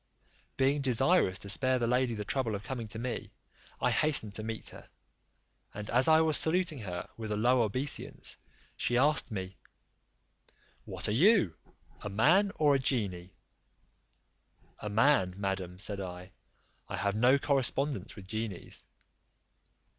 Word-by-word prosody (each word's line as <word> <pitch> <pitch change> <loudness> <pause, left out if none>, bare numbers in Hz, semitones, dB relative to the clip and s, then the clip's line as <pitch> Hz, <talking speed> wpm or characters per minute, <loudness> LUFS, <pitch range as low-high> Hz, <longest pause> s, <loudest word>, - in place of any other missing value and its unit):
Being 135 +2 +2
desirous 130 - +2
to 100 - -7
spare 130 +4 +3
the 120 - 0
lady 125 0 +1
the 105 -1 -5
trouble 115 -2 -1
of 100 - -6
coming 125 -4 -5
to 110 - -6
me, 120 +2 -4 0.5
I - - +1
hastened 140 -9 +2
to 110 - -5
meet 110 0 -4
her; - - -13 0.9
and 105 +1 -6
as 125 +2 +4
I 160 0 +6
was 160 -1 +3
saluting 165 -3 0
her 90 -5 -5
with 110 -2 -6
a 105 - -1
low 125 +3 +3
obeisance, 130 +6 -1 0.4
she 120 - 0
asked 150 +4 +3
me, 95 -2 -6 1.3
"What - - -3
are - - 0
you, 135 - +4 0.5
a 105 - -5
man 170 - +3
or 150 -2 +3
a 135 - +2
genie?" 95 -9 -2 1.4
"A 105 - -5
man, 105 -4 +3
madam," 95 -2 -3
said 100 +1 -3
I; 90 -1 -8 0.6
"I - - -4
have 100 0 -1
no 125 +5 +4
correspondence 135 -5 -1
with 95 -3 -11
genies." 110 -3 -5
115 Hz, 145 wpm, -30 LUFS, 100-135 Hz, 1.4 s, I